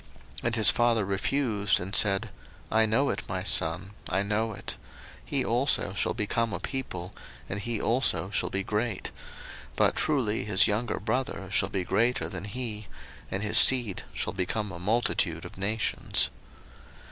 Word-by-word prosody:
01:048:019 - - -4
And 115 -1 +1
his 110 -2 +6
father 120 -3 +2
refused, 105 0 0
and 95 +3 -4
said, 105 +1 +3 0.4
I 110 0 +4
know 135 +6 +2
it, 100 - -4
my 95 0 -3
son, 95 0 +2 0.2
I 95 - 0
know 110 +2 -1
it: - - -6 0.5
he 135 -3 -2
also 120 -4 +2
shall - - 0
become 115 0 -1
a - - -3
people, 100 -9 -5 0.3
and 95 - -4
he 115 +2 -3
also 115 -5 +1
shall - - 0
be 95 0 -2
great: 105 0 -2 0.6
but - - +2
truly 125 -8 +1
his 100 -2 +4
younger 110 +3 -1
brother 110 -2 -3
shall 100 -2 +1
be 95 -2 -2
greater 115 +8 +1
than - - -6
he, 110 -2 -5 0.4
and 95 +2 -3
his 105 - +5
seed 120 -7 +6
shall - - -3
become 100 +3 -2
a 85 - -8
multitude 110 +7 0
of - - -10
nations. 105 +3 0
105 Hz, 160 wpm, -27 LUFS, 95-120 Hz, 0.6 s, his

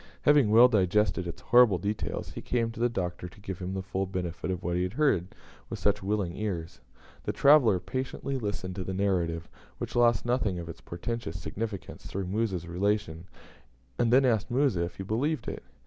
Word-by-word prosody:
Having 145 -6 +5
well 115 +3 +8
digested 105 -3 +2
its 85 - -7
horrible 120 -5 +5
details, 100 +4 -3
he - - -7
came 115 -2 0
to 115 - -10
the 120 +1 +3
Doctor 90 -4 -4
to 90 - -18
give 95 -3 -6
him 95 +1 -4
the 95 - -3
full 95 0 -2
benefit 90 -2 -4
of 90 -2 -3
what 85 0 -1
he 90 - +1
had 90 +1 -2
heard 125 - +2 0.4
with - - -4
such 105 0 +1
willing 95 -3 -1
ears. 85 -10 -4 0.4
The - - 0
traveller 140 -10 +5
patiently 130 +4 -4
listened 100 -4 -4
to 95 - -2
the 95 +1 -4
narrative, 85 -4 0 0.3
which - - -6
lost 120 -2 +3
nothing 120 -6 0
of 85 -1 -6
its 80 - -9
portentous 85 -1 -5
significance 100 +4 -6
through 95 0 -3
Musa's 95 -3 -1
relation, 90 -2 -1 0.7
and 115 -1 +3
then 130 +2 +6
asked 115 -4 +1
Musa 120 -9 +2
if 85 - -8
he 95 - -6
believed 130 +10 -1
it. - - -4
100 Hz, 195 wpm, -28 LUFS, 90-115 Hz, 0.7 s, well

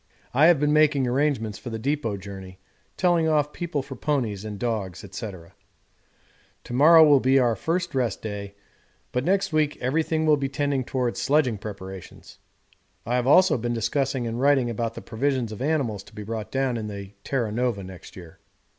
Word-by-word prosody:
I 145 +5 +6
have 170 -4 +5
been 150 0 +2
making 150 -3 +4
arrangements 125 -4 0
for 125 - -7
the 115 - -4
depôt 115 -4 -2
journey, 95 -1 -9 0.4
telling 175 -3 +2
off 150 -2 +1
people 165 -5 -3
for 135 0 -8
ponies 120 -8 -1
and 105 -1 -6
dogs, 105 -6 -3
&c._9_ 95 -5 -8 1.1
To - - -8
morrow 155 +3 +7
is - - +7
to - - +2
be 130 +1 +4
our 120 -3 +3
first 175 +6 -2
rest 125 -6 -1
day, 100 -2 -6 0.6
but 125 - -1
next 195 +1 +1
week 155 -1 +1
everything 160 +4 0
will 155 -1 +4
be 135 -1 -2
tending 140 -1 -1
towards 125 -2 -2
sledging 130 -4 +2
preparations. 95 -3 -9 0.7
I 120 - -2
have 125 0 0
also 155 -1 +5
been 120 +1 -2
discussing 125 +2 -1
and 115 +2 -3
writing 135 -4 +3
about 115 0 -3
the - - -8
provisions 125 0 -1
of 110 - -8
animals 135 -9 0
to - - -17
be 105 - -6
brought 110 0 -5
down 135 -2 0
in 110 -1 -4
the 100 -2 -7
Terra 120 -6 -1
Nova 120 -3 -1
next 95 -1 -11
year. 90 0 -12
125 Hz, 185 wpm, -25 LUFS, 110-145 Hz, 1.1 s, morrow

